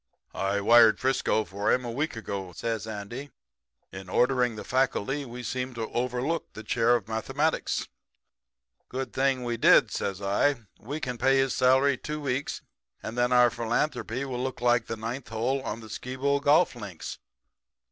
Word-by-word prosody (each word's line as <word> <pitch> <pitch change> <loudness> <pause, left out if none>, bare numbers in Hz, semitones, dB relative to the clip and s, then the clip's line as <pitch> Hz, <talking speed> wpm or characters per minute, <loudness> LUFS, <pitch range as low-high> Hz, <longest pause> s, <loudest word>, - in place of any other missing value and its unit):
"'I 100 +1 -1
wired 115 +1 +7
to - - -16
Frisco 130 -4 +1
for 100 +3 -1
him 125 0 +1
a 120 - -3
week 145 +5 -2
ago,' 100 -5 -5
says 110 +5 -3
Andy. 110 +6 -6 0.6
'In 95 0 -9
ordering 125 +1 +2
the 105 - -7
faculty 135 +2 0
we 125 0 -8
seemed 130 +2 -3
to 115 - -4
have 110 - -5
overlooked 125 +6 -2
the 110 - -7
chair 120 +1 +3
of 110 -4 -3
mathematics.' 135 +8 -1
"'A 65 -1 -28
good 130 -1 -4
thing 135 -1 +1
we 120 -1 -2
did,' - - +5
says 95 -1 -3
I. 100 +9 +2 0.2
'We 145 +7 -6
can 125 -2 -3
pay 135 0 +4
his 135 -1 +2
salary 130 +1 +4
two 150 0 -4
weeks, 140 -1 -3 0.4
and 110 - -5
then 125 0 +1
our 125 -1 +6
philanthropy 120 +2 -1
will 125 -2 -4
look 130 -1 -4
like 120 -1 +2
the 115 - -4
ninth 115 +4 -5
hole 120 +5 -1
on 115 -3 -5
the 110 - -10
Skibo 130 +5 -1
golf 150 +2 +4
links.' 100 -8 -7
125 Hz, 175 wpm, -27 LUFS, 110-135 Hz, 0.6 s, wired